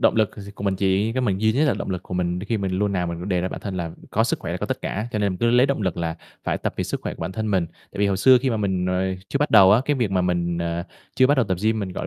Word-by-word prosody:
Động - - +3
lực 110 -2 +1
gi 100 -1 -9
của 100 - -7
mình 95 -1 +1
chỉ 100 +3 +1
có 130 - -1
mình 100 -6 0
duy 110 0 +3
nhất 140 +7 +2
là 150 - +2
động - - -4
lực 90 -1 -3
của 90 - -7
mình 90 0 -1
khi 105 +3 -2
mình 95 -2 -2
luôn 105 -1 +1
nào 90 -2 0
mình 85 +3 -5
đề 90 -2 +1
ra 90 - -1
bản - - -7
thân 100 -3 -5
là 85 -2 -3 0.2
có - - +2
sức - - 0
khỏe - - -5
là - - -3
có - - -3
tất - - -3
cả, 105 +4 -3
cho 110 - -1
nên 100 -2 +1
mình 90 - -7
cứ 115 0 +2
lấy 125 +2 +5
động 140 -5 -1
lực 95 -4 -1
là 85 -1 -2 0.3
phải - - -1
tập - - -2
vì - - -1
sức - - -3
khỏe - - -4
của - - -14
bản 85 +3 -3
thân 110 +2 -2
mình. 95 -4 +1
Tại - - -16
vì 100 - +4
hồi 100 - +1
xưa 130 +6 +6
khi 130 - +1
mà 115 - 0
mình, 95 -3 -1
ờ, 90 0 0 0.2
chưa 140 - -1
bắt 145 +1 0
đầu 95 0 +8
á, 110 - +5
cái 145 0 +1
việc 120 -6 0
mà 95 -1 +1
mình, 85 -1 0
ờ, 85 0 -2 0.3
chưa 130 - +6
bắt 145 +2 +3
đầu 130 - +3
tập 95 - 0
gym 110 0 +2
mình, 95 -2 -4
gọi - - -4
100 Hz, 365 wpm, -23 LUFS, 90-110 Hz, 0.3 s, đầu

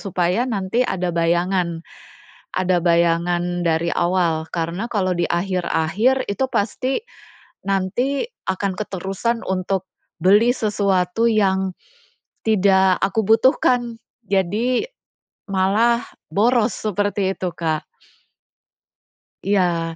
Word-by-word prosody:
supaya 185 +5 0
nanti 200 +2 -1
ada 180 -2 -2
bayangan 170 0 0 0.7
ada 185 -2 +1
bayangan 175 +1 +1
dari 170 0 0
awal 170 -3 0
karena 175 +7 -3
kalau 190 -5 0
di 175 -1 -1
akhir-akhir 185 +7 0
itu 200 +7 -1
pasti 255 +6 -1 0.7
nanti 200 +9 0 0.2
akan 190 +1 -1
keterusan 200 +4 -3
untuk 190 0 -1 0.4
beli 220 +6 +5
sesuatu 200 0 +1
yang 190 -4 +1 0.7
tidak 190 -3 +4
aku 195 +2 0
butuhkan, 240 0 +3 0.3
jadi 210 - +1 0.6
malah 210 +5 +2 0.2
boros, 220 +4 +2
seperti 205 -2 -1
itu, 185 -2 -3
Kak. 160 -2 -1 1.6
Iya. 175 -4 +1
190 Hz, 95 wpm, -21 LUFS, 175-215 Hz, 1.6 s, beli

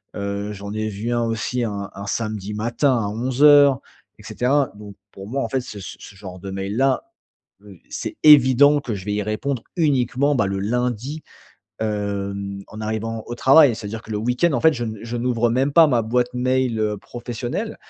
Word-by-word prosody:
Heu, 100 0 -3
j'en 100 +1 -7
ai 110 0 -2
vu 105 +4 -4
un 120 0 +1
aussi 115 +2 -2
un 100 -3 -4
un 100 - -7
samedi 105 -1 -3
matin 120 +5 +1
à 105 -3 -1
11:00, 135 +5 +5 0.4
et - - -14
cetera. 135 +2 0
Donc 105 -1 -11 0.2
pour 95 +1 -10
moi, 135 +4 -2
en - - -2
fait, 130 - -1
ce 105 -4 -9
ce 95 - -9
ce 100 - -12
genre 95 -2 -9
de 95 +1 -7
mails-là, 105 +8 0 0.6
heu, - - -14
c'est 320 - -5
évident 145 0 +7
que 120 -5 -4
je 95 -2 -7
vais 105 - -2
y 105 - -1
répondre 115 +4 -3
uniquement, 140 -2 +1
bah, 105 -6 +1
le 95 0 -2
lundi, 125 +6 -2 0.6
hem, 100 -2 -3
en 110 - -9
arrivant 110 +1 -3
au 120 - -5
travail. 135 0 +6
C'est-à-dire 110 +1 -6
que 110 - -13
le 105 - -2
week-end, 125 +9 +1
en - - 0
fait, 160 - +6
je 120 -5 -4
n 110 -2 -5
je 115 +1 -5
n'ouvre 120 -1 +1
même 130 +4 +1
pas 165 +2 +7
ma 125 -6 +2
boîte 120 +2 0
mail, 125 -1 0
heu, 105 -1 0
professionnelle 120 - -5
115 Hz, 200 wpm, -21 LUFS, 105-130 Hz, 0.6 s, évident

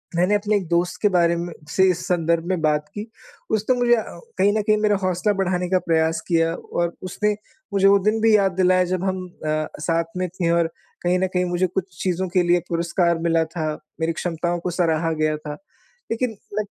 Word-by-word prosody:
मैंने 180 +4 +3
अपने 205 +1 +1
एक 190 -5 -1
दोस्त 175 +1 0
के 210 - +4
बारे 170 -2 +3
म 170 +1 -4 0.2
से 190 +4 +2
इस 180 0 -4
संदर्भ 170 -1 +1
में 185 -1 0
बात 150 -1 +1
की। 205 +1 -5 0.5
उसने 220 +4 +2
मुझे 245 -1 +4
अ, 220 - -1 0.4
कहीं 200 - +5
न 215 - +2
कहीं 215 0 +3
मेरा 210 -1 +2
हौसला 185 +3 +1
बढ़ाने 180 -2 -1
का 185 0 +3
प्रयास 160 -1 +1
किया, 165 -1 +2
और 170 0 -3
उसने 210 +3 0 0.4
मुझे 195 0 +4
वो 200 - +7
दिन 215 +3 +1
भी 225 -1 +5
याद 195 -2 +3
दिलाया 185 0 +4
जब 185 0 -2
हम 190 -1 -2 0.2
अ, 155 0 0
साथ 165 +1 +1
में 185 - 0
थे 175 -1 -2
और 170 -1 +3 0.4
कहीं 180 +1 +2
न 190 - +1
कहीं 180 0 +1
मुझे 180 +1 0
कुछ 185 0 -2 0.2
चीज़ों 185 0 0
के 180 0 +2
लिए 175 0 +3
पुरस्कार 170 0 +1
मिला 165 -1 +2
था, 160 -1 -4 0.3
मेरी 160 +1 0
क्षमताओं 175 +1 -2
को 175 - -3
सराहा 165 -2 +1
गया 155 -1 0
था। 150 -1 -7 0.6
लेकिन 230 0 -1 0.2
मैं 215 - +2
180 Hz, 210 wpm, -22 LUFS, 165-195 Hz, 0.6 s, वो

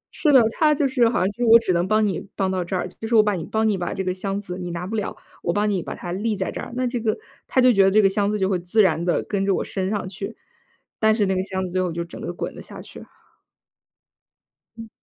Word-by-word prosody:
是 300 - +2
的， 260 -3 +8
他 300 +4 +3
就 285 -1 +1
是 245 -3 +3
好 235 - -1
像 185 +2 +2
就 210 - -16
是 245 - 0
我 230 0 +9
只 225 -6 0
能 175 +2 +1
帮 215 +1 +3
你 190 -5 -1 0.2
帮 190 -1 0
到 185 -1 -1
这 175 +2 -4
儿， 180 - -1
就 220 +4 -8
是 235 - +1
我 215 - +7
把 210 - +1
你 170 -4 -3
帮 220 0 0
你 210 - +2
把 175 -2 -3
这 190 - -2
个 185 - -1
箱 195 +1 -3
子 185 -2 -7
你 180 - -5
拿 175 +1 -4
不 220 - -4
了， 210 -2 -3 0.2
我 170 - 0
帮 205 +4 +1
你 195 -4 0
把 - - -6
它 175 - -7
立 210 +3 -1
在 190 - -2
这 - - -6
儿， - - -8
那 255 0 0
这 245 -1 -2
个 220 -1 0 0.3
他 260 - +1
就 250 -1 +6
觉 195 - +5
得 190 - +5
这 210 +3 +4
个 200 - +6
箱 200 +1 0
子 210 - -1
就 190 -1 +1
会 185 -2 0
自 180 +5 +2
然 170 -3 +1
地 175 - +1
跟 200 -2 -2
着 195 -1 +2
我 - - -1
升 190 -1 -3
上 205 -2 -2
去， 195 +1 -7 0.6
但 220 0 +4
是 215 -2 +2
那 190 -1 0
个 185 - 0
箱 190 -1 -3
子 180 - -7
最 185 +1 0
后 180 -2 -1
就 170 +1 -4
整 170 - -10
个 - - -4
滚 - - -5
了 - - -9
下 - - -11
去。 - - -11 1.7
嗯。 225 -1 -9
195 Hz, 325 characters per minute, -23 LUFS, 185-220 Hz, 1.7 s, 我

